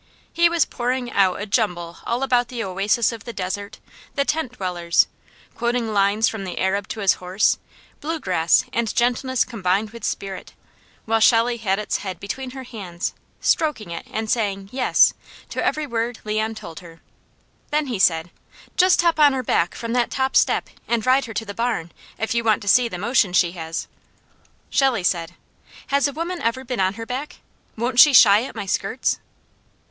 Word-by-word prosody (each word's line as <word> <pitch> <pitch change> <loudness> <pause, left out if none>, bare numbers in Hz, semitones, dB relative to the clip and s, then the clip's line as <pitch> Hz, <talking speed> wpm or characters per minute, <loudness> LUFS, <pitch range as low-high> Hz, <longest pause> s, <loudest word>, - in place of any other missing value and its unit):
He 340 0 +4
was 340 -3 +2
pouring 245 0 -2
out 190 -2 +2
a 205 - -3
jumble 180 -6 -1
all 240 +3 -1
about 245 -2 +2
the 240 -2 -4
oasis 200 +6 +1
of 225 -2 -8
the 235 - -6
desert, 200 +1 -4 0.4
the 280 -2 +1
tent 300 -6 -1
dwellers, 175 -5 +1 0.5
quoting 235 -2 -1
lines 205 +2 +3
from 220 -3 -3
"The 185 -2 -6
Arab 195 +1 0
to 220 - -6
His 195 -2 +3
Horse," 185 +3 +1 0.4
bluegrass, 195 - +1
and 235 -3 -1
gentleness 250 +1 +1
combined 205 -2 -1
with 230 -2 -11
spirit, 195 -3 -5 0.5
while 225 0 +2
Shelley 235 +1 +4
had 195 -4 0
its 210 0 -1
head 185 -4 -6
between 255 +7 -5
her 265 +1 -8
hands, 190 -8 -5 0.3
stroking 255 - 0
it 170 - -7
and 220 0 -3
saying, 200 -4 -1
"Yes," 255 -1 +4 0.4
to - - -2
every 305 0 0
word 235 -2 -2
Leon 215 +1 -1
told 165 -6 -9
her. 165 -2 -14 0.7
Then 300 0 +1
he 240 -7 -3
said: 165 -1 +2 0.5
"Just 365 -1 +5
hop 335 -2 +2
on 290 -2 +6
her 260 -1 -2
back 175 -6 +1
from 230 0 -4
that 245 -1 +1
top 265 0 -1
step - - +2 0.2
and 235 -2 0
ride 260 +1 +3
her 225 - -8
to 225 - -2
the 200 - -6
barn, 225 -7 -2 0.3
if 225 - -2
you 235 0 0
want 215 -2 +2
to - - -10
see 245 +4 +5
the 180 - -5
motion 210 -1 +1
she 175 -2 +3
has." 165 -2 -5 0.8
Shelley 260 -8 +2
said: 170 -2 -1 0.5
"Has 280 +1 +3
a - - -3
woman 335 +4 -4
ever 230 +3 -1
been 250 -2 -4
on 190 +1 +1
her 225 +1 -6
back? 260 +5 -5 0.4
Won't 240 +2 0
she 295 +1 +9
shy 215 -3 +7
at - - -9
my - - -4
skirts?" 195 +5 -1
225 Hz, 185 wpm, -22 LUFS, 195-255 Hz, 0.8 s, she